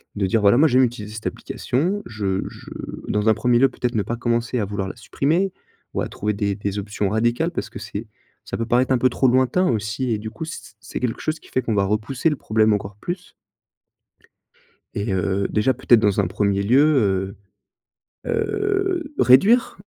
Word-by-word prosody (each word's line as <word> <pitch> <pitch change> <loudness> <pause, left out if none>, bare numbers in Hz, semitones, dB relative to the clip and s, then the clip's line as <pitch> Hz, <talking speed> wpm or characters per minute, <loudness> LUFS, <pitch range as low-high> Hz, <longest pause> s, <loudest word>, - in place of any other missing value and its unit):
de 100 - 0
dire: 110 +3 +1
«Voilà, 100 +3 +5
moi, 155 +4 +6
j'aime 130 -2 +4
utiliser 110 -4 -3
cette 110 - -4
application». 175 +11 -2
Je 100 -4 -2
je - - -13 0.4
dans 105 +1 +1
un 110 - +6
1er 120 +1 +2
lieu 135 - +5
peut - - -19
être 125 -1 0
ne 105 - +1
pas 120 +4 -4
commencer 120 +1 0
à 105 - 0
vouloir 100 -1 -3
la - - -8
supprimer 165 +10 0 0.4
ou - - -1
à - - -2
trouver 105 +1 -2
des 100 -1 -1
des 100 0 -3
options 100 -1 -2
radicales 120 - +1
parce 140 - -4
que 115 - -9
c'est 110 +3 -6 0.4
ça - - -5
peut 115 - -2
paraître 125 +3 +2
un 130 - +4
peu 130 - +3
trop 130 - +1
lointain 130 +9 +3
aussi 115 +3 -1
et 110 - +1
du 110 +1 -6
coup, 160 +8 -8
c 165 - -6
c - - -15
c'est - - -6
quelque 125 -2 -2
chose 155 0 -2
qui - - -18
fait 130 - 0
qu'on 115 - -2
va 100 -1 +2
repousser 110 +9 0
le 150 - -1
problème 110 -4 +2
encore 100 0 -4
plus 175 - -6 1.6
et 100 +1 -3
heu 95 +1 0
déjà, 110 +5 +2
peut-être 120 -2 +4
dans 105 -2 +2
un 100 - +2
1er 100 +1 0
lieu, 105 -6 +3 0.9
heu - - -2
heu, 390 -6 -1
réduire, 200 - +5
115 Hz, 210 wpm, -22 LUFS, 105-135 Hz, 1.6 s, moi